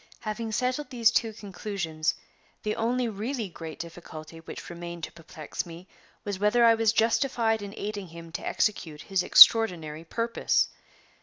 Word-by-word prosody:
Having 220 +1 -4
settled 255 +4 -1
these 235 -3 +3
two 230 -1 +1
conclusions, 190 -6 -3 0.5
the 215 0 -1
only 240 +2 0
really 225 +2 -3
great 165 -2 -8
difficulty 165 -1 -9
which 165 - -9
remained 170 -1 -8
to - - -4
perplex 160 -2 -7
me 170 +2 -11 0.4
was 200 -2 -4
whether 210 +4 +4
I 230 - +7
was 225 -1 +2
justified 225 -1 +1
in 200 0 -7
aiding 205 -2 -5
him 165 0 -11
to 170 - -6
execute 160 -8 -1
his 190 -2 0
extraordinary 170 -7 +6
purpose. 230 +7 0
205 Hz, 150 wpm, -27 LUFS, 170-225 Hz, 0.5 s, I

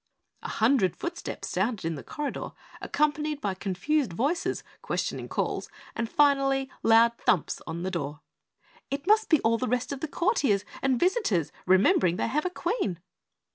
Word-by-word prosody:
A - - -6
hundred 220 - +2
footsteps 345 0 -5
sounded 225 -8 -1
in 165 - 0
the 145 - -6
corridor, 295 -1 -5 0.3
accompanied 300 0 0
by 200 -7 -1
confused 195 - -1
voices, 285 - -1 0.2
questioning - - -3
calls - - -2 0.3
and 230 0 -2
finally 275 -2 +3
loud 230 +1 +5
thumps 180 -3 +1
on 170 +2 -4
the 190 - -2
door. 150 -4 -4 0.7
"It 280 +2 -3
must 430 +2 +4
be 315 - +5
all 230 0 +2
the 255 - -1
rest 250 +3 -1
of 280 - -4
the 320 - -3
courtiers 290 - +1 0.2
and 260 -3 +2
visitors 350 - +1 0.2
remembering 185 -1 +4
they - - -1
have 300 +7 0
a - - -1
Queen!" 290 - -2
250 Hz, 160 wpm, -27 LUFS, 190-300 Hz, 0.7 s, loud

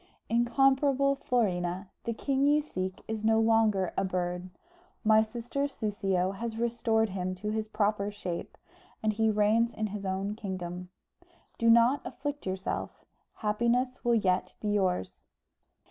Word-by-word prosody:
"Incomparable 270 +4 +3
Florina, 185 -7 -1
the 235 - -1
king 275 +3 +1
you 295 +1 +5
seek 185 -10 -4
is 220 -1 -4
no 220 0 +4
longer 220 -4 +3
a - - +1
bird; 180 -1 -2 0.5
my 220 -1 +6
sister 240 +5 -2
Soussio 195 -7 -1
has 230 0 -4
restored 225 -1 +1
him 185 -1 -3
to 210 +3 -4
his 220 0 -2
proper 210 -1 0
shape, 185 -4 -6 0.5
and 215 0 +2
he 220 +1 +2
reigns 215 +3 +2
in 220 - -1
his 210 -1 -5
own 195 +1 -2
kingdom. 180 -4 -5 0.7
Do 230 - +3
not 235 +4 +5
afflict 290 -4 -5
yourself; 190 0 -4 0.3
happiness 235 +4 0
will 240 -1 +3
yet 185 -4 +1
be 210 - -2
yours. 180 - 0
215 Hz, 140 wpm, -29 LUFS, 190-235 Hz, 0.7 s, my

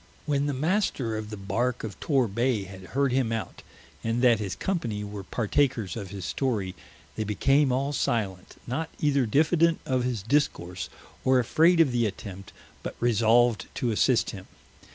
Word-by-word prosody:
When 145 -1 +1
the 145 - 0
Master 150 - 0
of 110 -1 -5
the 105 - -6
Barke 110 +6 -1
of 110 -3 -6
Tor 135 -5 +2
Bay 115 +1 0
had 95 0 -10 0.2
heard 140 -2 +3
him 125 -3 +1
out, 115 -5 -4 0.4
and 115 +2 0
that 120 -3 +5
his 100 -4 -3
company 120 - -2
were 105 -1 -6
partakers 115 0 0
of 100 -5 -6
his 95 -2 -6
Storie, 105 -6 -1 0.4
they 110 - -1
became 135 +7 +2
all 135 +3 0
silent, 100 -8 -2
not 160 +7 -3
eyther 140 -4 +2
diffident 160 +5 +3
of 130 -2 0
his 120 -5 -2
Discourse, 100 -9 0 0.3
or 130 0 +4
afraid 165 +8 +4
of 155 -5 +5
the 120 -2 +2
attempt, 95 -2 -8 0.3
but - - -6
resolved 115 -1 +3
to 120 - 0
assist 105 - +2
him. - - -10
120 Hz, 170 wpm, -27 LUFS, 105-140 Hz, 0.4 s, that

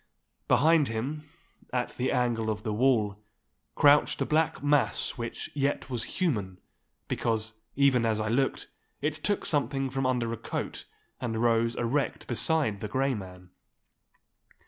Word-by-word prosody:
Behind 160 -1 +4
him, 140 +7 -4 0.4
at 125 -1 -2
the 125 - 0
angle 120 -3 0
of 105 0 -3
the 110 - -2
wall, 105 -4 +1 0.5
crouched 145 0 +5
a - - +1
black 155 -1 +1
mass 145 -7 +2
which 115 -1 -6
yet 140 -1 -1
was 120 -2 -1
human—because, 110 - -3 0.2
even 135 -3 +4
as 110 -1 +1
I 105 - -1
looked, 130 +5 0 0.4
it 150 +1 +1
took 180 +7 -2
something 140 -3 0
from 135 0 0
under 120 -3 0
a - - -4
coat, - - -5 0.3
and 115 -3 -2
rose 115 0 +2
erect 130 +4 -1
beside 125 -3 +2
the 105 - -4
Grey 135 +5 0
Man. 90 -4 -9
125 Hz, 140 wpm, -28 LUFS, 110-140 Hz, 0.5 s, crouched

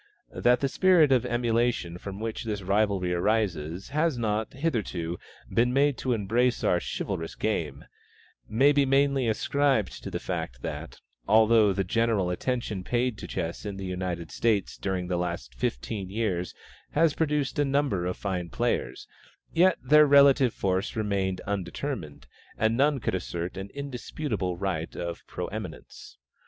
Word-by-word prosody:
That 125 0 +3
the 140 - +2
spirit 170 -1 +4
of 125 -1 +3
emulation 120 -7 0
from 100 +1 -7
which 110 0 -4
this 105 -3 -3
rivalry 100 -2 +1
arises 90 -3 -1
has 155 -1 +1
not, 110 -2 -1
hitherto, 100 - -2 0.3
been 120 +1 +3
made 140 +1 +3
to 130 - 0
embrace 120 +4 +1
our 90 - +3
chivalrous 80 0 -4
game, 80 -10 -2 0.6
may 135 +6 +5
be 145 -1 +3
mainly 135 -1 +2
ascribed 130 0 +1
to - - -6
the - - -3
fact - - -5
that, - - -6 0.3
although 110 0 +5
the 95 +1 0
general 105 -2 +1
attention 110 -1 -2
paid 125 +2 0
to - - -7
chess 80 - -4
in 100 -2 -5
the 95 - -5
United 90 -2 -4
States 110 -4 0
during 95 -2 -2
the 90 -1 -1
last 85 -8 -3
fifteen 90 - -3
years 95 -4 -2 0.4
has 160 0 +4
produced 150 -2 0
a - - +5
number 135 -10 0
of 90 - -3
fine 90 -4 -3
players, - - -2 0.5
yet 180 +1 +4
their 150 +3 +6
relative 140 -3 +6
force 95 +1 -1
remained 100 -4 -1
undetermined, 95 - -4 0.3
and 110 +1 +2
none 140 +2 +3
could - - -2
assert 90 -1 -3
an 95 +1 -6
indisputable 125 - -3
right 90 -4 -2
to 85 -1 -4
pre - - -4
eminence. - - -8
110 Hz, 150 wpm, -27 LUFS, 90-130 Hz, 0.6 s, their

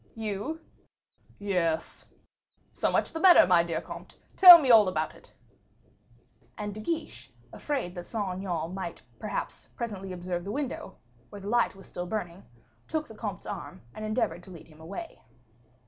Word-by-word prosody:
"You?" 220 +8 -4 0.8
"Yes." 180 -5 -2 0.7
"So - - 0
much - - 0
the 325 - -3
better, 365 0 +8
my 175 -1 +5
dear 170 -1 -3
comte; - - -10 0.2
tell 360 -3 +12
me 270 -5 +3
all 220 -4 +7
about 155 -4 -2
it." - - -18 1.3
And 205 -2 -4
De 215 - -8
Guiche, 320 +9 -4 0.2
afraid 270 -12 -3
that 175 -1 -8
Saint 200 -5 -3
Aignan 175 -3 -3
might 190 -3 -6 0.2
perhaps 205 -2 -5
presently 200 -5 -5
observe 175 -1 -4
the 200 - -5
window, 265 -6 -5 0.3
where 205 - -10
the 200 - -6
light 240 -2 +2
was 195 - -14
still 175 0 -6
burning, 180 -3 -4 0.5
took 315 -1 -2
the - - -11
comte's 205 -5 -6
arm 145 -3 -7
and 215 - -8
endeavored 215 -6 -1
to 180 - -13
lead 170 -2 -12
him 155 0 -17
away. 200 - -8
200 Hz, 165 wpm, -28 LUFS, 175-230 Hz, 1.3 s, tell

